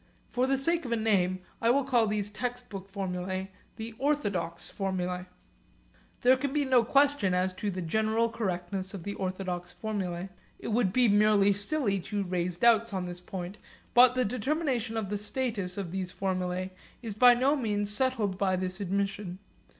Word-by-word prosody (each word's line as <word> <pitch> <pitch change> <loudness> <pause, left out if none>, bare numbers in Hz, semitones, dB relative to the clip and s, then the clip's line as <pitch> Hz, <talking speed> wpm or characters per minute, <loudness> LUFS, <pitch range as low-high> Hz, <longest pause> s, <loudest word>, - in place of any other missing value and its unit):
For 255 +1 +1
the 270 0 +2
sake 335 +5 +1
of 240 - -5
a - - +3
name, 190 -5 +1 0.2
I 230 - +3
will 275 +3 +4
call 245 -4 +3
these 205 -1 -1
textbook 240 -4 -5
formulae 190 -1 -3 0.2
the 225 0 -6
'orthodox' 205 - 0
formulae. 180 -2 -3 0.9
There 255 +1 +6
can 280 +1 -2
be 290 0 +1
no 255 -3 +4
question 275 -7 +3
as 185 +1 +1
to 205 +3 -3
the 185 -2 -3
general 220 +6 +1
approximate 230 - -4
correctness 190 -2 -3
of 180 - -7
the 200 - -4
orthodox 185 -2 -4
formulae. 190 -4 -3 0.3
It - - -6
would 220 -4 +2
be 245 +3 +4
merely 205 -1 +5
silly 205 0 +1
to 200 +3 -3
raise 180 -1 -2
doubts 230 +1 +4
on 185 -1 -2
this 180 0 -6
point. 185 +2 -6 0.3
But 250 0 +7
the 255 -1 +2
determination 250 0 -1
of 210 -4 -2
the 205 0 -2
status 210 -4 -3
of 190 -4 -4
these 185 -1 -3
formulae 185 -1 -2 0.3
is 225 -3 -4
by 245 +3 +7
no 265 +4 +3
means 205 -6 -1
settled 220 -6 0
by 190 -2 +2
this 185 +2 -3
admission. 195 -1 -2
205 Hz, 175 wpm, -29 LUFS, 185-240 Hz, 0.9 s, But